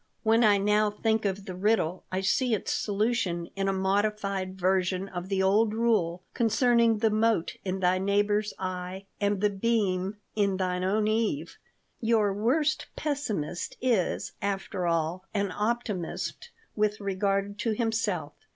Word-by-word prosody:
When 225 +1 +4
I 210 -2 +6
now 210 +1 +3
think 220 +1 0
of 195 0 -2
the 185 - -5
riddle 185 -2 +1
I 185 +1 -1
see 230 +5 +2
its 200 - -3
solution 205 -5 -1
in 195 0 -1
a - - +3
modified 195 -1 -1
version 185 +1 +1
of 180 -1 -6
the 190 -1 +1
old 210 +3 +3
rule 200 -7 +1
concerning 235 -1 +3
the 220 0 +2
mote 215 -4 +1
in 190 0 -3
thy 185 0 +3
neighbor's 205 +2 +1
eye 185 +1 -5
and 205 -1 0
the 210 -1 +3
beam 195 -2 0 0.2
in 200 -3 +1
thine 180 -1 -1
own 210 +3 +1
eve. 215 -8 -1 0.4
Your 220 -3 +2
worst 290 +9 +1
pessimist 240 - -3
is, 235 -8 0
after 195 -2 -2
all, 165 +2 0
an 200 -2 0
optimist 215 - -3 0.3
with 210 0 +1
regard 200 +1 -1
to 225 -2 0
himself. 210 -9 -1
200 Hz, 145 wpm, -28 LUFS, 185-220 Hz, 0.4 s, I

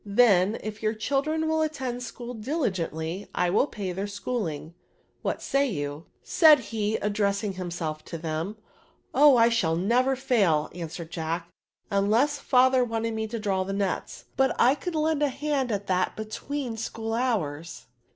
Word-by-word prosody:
Then, 205 -1 +4
if 215 0 -6
your 215 0 0
children 285 +8 0
will 315 0 +1
attend 265 -6 -2
school 245 0 -7
diligently, 195 - -2
I 180 0 +2
will 215 +8 +3
pay 200 -8 -4
their 195 +3 -3
schooling; 200 -7 -4 0.5
what - - -2
say 280 +1 +2
you? 145 -4 -4 0.2
said 315 -4 +7
he, 220 -3 -2
addressing 200 0 0
himself 170 -4 -4
to 165 - -6
them. 160 +5 -3 0.6
^^ 270 - +2
Ohj 285 -5 +8
I 230 +1 +6
should 210 -9 +1
never 245 +8 +2
fail," 200 - +2
answered 165 -1 -7
Jack, 165 +1 -3 0.2
" - - -41
imless 225 +9 +2
fiithefr 255 -1 +4
wanted 230 0 -2
me 220 0 -2
to 230 +2 -4
draw 195 -3 0
the 195 +1 -4
nets; 195 -2 -3
but 265 -1 +2
I 255 - +6
could 325 +4 -5
lend 310 -1 +1
a 295 - +3
hand 280 -2 -1
at 205 -1 -2
that 185 -1 0
between 230 +3 -4
school 225 0 -4
hours." 170 - -2
215 Hz, 165 wpm, -26 LUFS, 185-255 Hz, 0.6 s, Ohj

